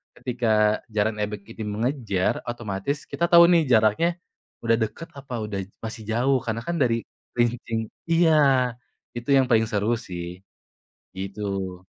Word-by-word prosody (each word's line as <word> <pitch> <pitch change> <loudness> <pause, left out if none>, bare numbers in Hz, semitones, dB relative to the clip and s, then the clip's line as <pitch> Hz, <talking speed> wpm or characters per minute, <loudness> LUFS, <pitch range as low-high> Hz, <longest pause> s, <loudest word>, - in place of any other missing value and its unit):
ketika 110 -4 +1 0.2
jaran 105 0 +1
ebeg 105 -1 -3
ini 115 +1 -8
mengejar, 110 -3 -1
otomatis 120 +3 -3
kita 170 - +1
tahu 170 0 +9
nih 165 -4 +4
jaraknya 110 +10 +4 0.5
udah 115 0 +3
deket, 110 +9 -4
apa 135 -2 -9
udah 105 -2 -4 0.2
masih 110 0 -6
jauh. 125 +4 +2
Karena 115 0 -2
kan 170 - -2
dari 115 -3 +2 0.3
kerincing 120 -1 0 0.3
iya, 165 0 +5 0.9
itu 120 +3 -6
yang 135 - +4
paling 115 -1 +4
seru 105 0 0 0.2
sih, 85 -2 -5 0.9
gitu. 95 -2 -4
115 Hz, 135 wpm, -24 LUFS, 105-125 Hz, 0.9 s, tahu